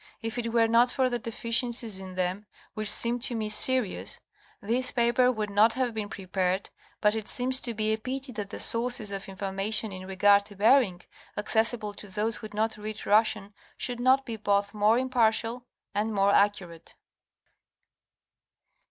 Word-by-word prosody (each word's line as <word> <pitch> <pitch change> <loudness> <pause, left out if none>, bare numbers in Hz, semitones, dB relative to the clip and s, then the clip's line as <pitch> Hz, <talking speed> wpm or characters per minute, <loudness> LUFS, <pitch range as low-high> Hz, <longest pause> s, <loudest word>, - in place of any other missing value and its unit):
If 225 +2 -4
it 230 -1 -3
were 230 -1 +3
not 235 +2 +4
for 255 0 0
the 240 - -2
deficiencies 230 -1 0
in 190 -1 -9
them, 185 +3 -3 0.3
which 215 -1 -1
seem 235 +3 +4
to 245 0 +2
me 215 -1 -3
serious, 250 -1 +2 0.4
this 240 +5 +1
paper 240 +1 +2
would 215 -4 -4
not 215 +3 +4
have 255 -2 -2
been 215 -2 -5
prepared, 190 0 -3 0.3
but 210 -1 +3
it 220 -1 -5
seemed 255 +1 -2
to 235 -2 +2
be 215 0 0
a 220 - -3
pity 260 +3 -5
that 210 -3 -6
the - - -8
sources 230 -2 +1
of 195 0 -6
information 195 +3 -1
in 185 0 -8
regard 200 +1 +4
to 205 - -13
Bering, 210 -3 +3 0.4
accessible 220 0 -1
to 205 - -10
those 210 +4 -2
who 215 - -8
do 210 - -15
not 220 0 -1
read 215 +1 -7
Russian 215 -1 +1 0.2
should 245 -1 -2
not 260 +2 +3
be 230 -3 -6
both 200 -1 0
more 210 +2 +3
impartial 245 -1 0 0.3
and 210 +2 -1
more 200 -1 +2
accurate. 190 -5 -1
220 Hz, 170 wpm, -27 LUFS, 205-235 Hz, 0.4 s, not